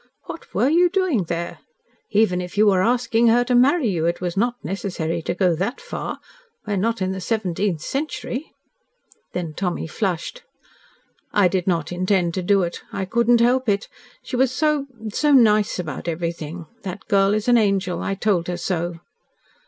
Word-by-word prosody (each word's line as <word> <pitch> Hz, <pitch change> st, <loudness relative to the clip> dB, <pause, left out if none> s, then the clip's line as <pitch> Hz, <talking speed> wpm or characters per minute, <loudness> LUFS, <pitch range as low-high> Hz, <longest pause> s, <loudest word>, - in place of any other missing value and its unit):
"What 330 Hz, -, -9 dB
were 220 Hz, +7 st, +3 dB
you 345 Hz, +4 st, +4 dB
doing 350 Hz, -, +1 dB
there? 170 Hz, +1 st, -4 dB, 0.5 s
Even 200 Hz, -4 st, +2 dB
if 180 Hz, +2 st, -8 dB
you 215 Hz, -, +5 dB
were 190 Hz, -3 st, +4 dB
asking 235 Hz, +1 st, +2 dB
her 240 Hz, +2 st, +5 dB
to 250 Hz, 0 st, -1 dB
marry 265 Hz, +3 st, +4 dB
you, 170 Hz, -5 st, 0 dB
it 170 Hz, -, -1 dB
was 175 Hz, -1 st, -3 dB
not 240 Hz, +5 st, +1 dB
necessary 170 Hz, -2 st, -3 dB
to 175 Hz, -, -3 dB
go 180 Hz, -2 st, +2 dB
that 195 Hz, +10 st, -2 dB
far. -, -, -5 dB, 0.5 s
We 210 Hz, -, -2 dB
are -, -, 0 dB
not 225 Hz, +1 st, 0 dB
in 185 Hz, -, -1 dB
the 190 Hz, 0 st, -4 dB
seventeenth 190 Hz, -5 st, -1 dB
century." 280 Hz, -, -4 dB, 0.8 s
Then 170 Hz, -3 st, -3 dB
Tommy 180 Hz, +1 st, -2 dB
flushed. 180 Hz, -, -3 dB, 0.9 s
"I 200 Hz, -3 st, +4 dB
did 180 Hz, 0 st, -1 dB
not 165 Hz, -3 st, 0 dB
intend 180 Hz, -1 st, +1 dB
to 185 Hz, -, -2 dB
do 195 Hz, +1 st, +3 dB
it. 170 Hz, 0 st, -4 dB
I 195 Hz, -, -3 dB
could 235 Hz, +5 st, 0 dB
not 240 Hz, -1 st, +6 dB
help 250 Hz, 0 st, +3 dB
it. 200 Hz, +1 st, 0 dB, 0.3 s
She -, -, -5 dB
was 255 Hz, 0 st, +3 dB
so 295 Hz, +1 st, +1 dB, 0.3 s
so 295 Hz, -1 st, +2 dB
nice 215 Hz, -5 st, +4 dB
about 170 Hz, -3 st, -5 dB
everything. 170 Hz, 0 st, -4 dB, 0.2 s
That 185 Hz, -2 st, -7 dB
girl 200 Hz, -1 st, +3 dB
is 215 Hz, +1 st, -2 dB
an 240 Hz, -1 st, +6 dB
angel. 195 Hz, -4 st, 0 dB
I 195 Hz, -, -2 dB
told 195 Hz, -4 st, 0 dB
her 180 Hz, -1 st, -2 dB
so." 175 Hz, -1 st, -3 dB
195 Hz, 185 wpm, -22 LUFS, 175-235 Hz, 0.9 s, not